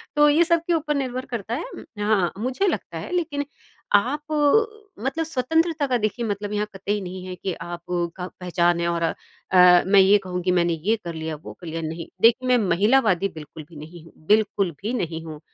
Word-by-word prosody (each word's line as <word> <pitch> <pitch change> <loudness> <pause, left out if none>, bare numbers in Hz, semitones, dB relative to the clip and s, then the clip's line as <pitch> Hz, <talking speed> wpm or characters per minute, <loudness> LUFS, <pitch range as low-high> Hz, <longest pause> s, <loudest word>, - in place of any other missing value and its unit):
तो 295 0 +6
ये 310 +4 +5
सब 335 -1 +2
के 345 - +2
ऊपर 305 -2 0
निर्भर 255 -2 -3
करता 230 -3 -5
है 290 - -3
उम, - - -9 0.2
हाँ 205 -5 +2
मुझे 255 - -1
लगता - - -3
है - - -7
लेक़िन 300 -5 -1 0.5
आप 290 +9 0
अ, 415 - +1
मतलब 320 +5 -1
स्वतंत्रता 320 +2 0
का 255 -2 +1
देखिए 230 +2 -2
मतलब 205 0 -3
यहाँ 210 0 -1
कतई 200 +2 -2
नहीं 185 0 -7
है 185 -1 -6
कि 185 0 -4
आप 175 0 -6 0.4
का 180 - -4
पहचान 175 -1 +1
है 170 - 0
और 170 -1 -1
अ, 165 - 0 0.7
मैं 195 +1 +5
ये 195 +2 +6
कहूँ 180 0 -3
कि 180 - +2
मैंने 175 -1 +2
ये 180 +8 0
कर 170 - -4
लिया 160 -1 -4
वो 150 - -10
कर 175 - -12
लिया 165 +1 -4
नहीं। 160 +1 -5
देखिए 235 +3 +4
मैं 250 0 +5
महिलावादी 200 0 +3
बिल्कुल 155 0 -9
भी 170 - -15
नहीं 160 +3 -11
हूँ - - -17
बिल्कुल 210 -3 +2
भी 220 +4 -3
नहीं 165 -8 -3
हूँ। 155 -2 -8
205 Hz, 210 wpm, -23 LUFS, 175-275 Hz, 0.7 s, तो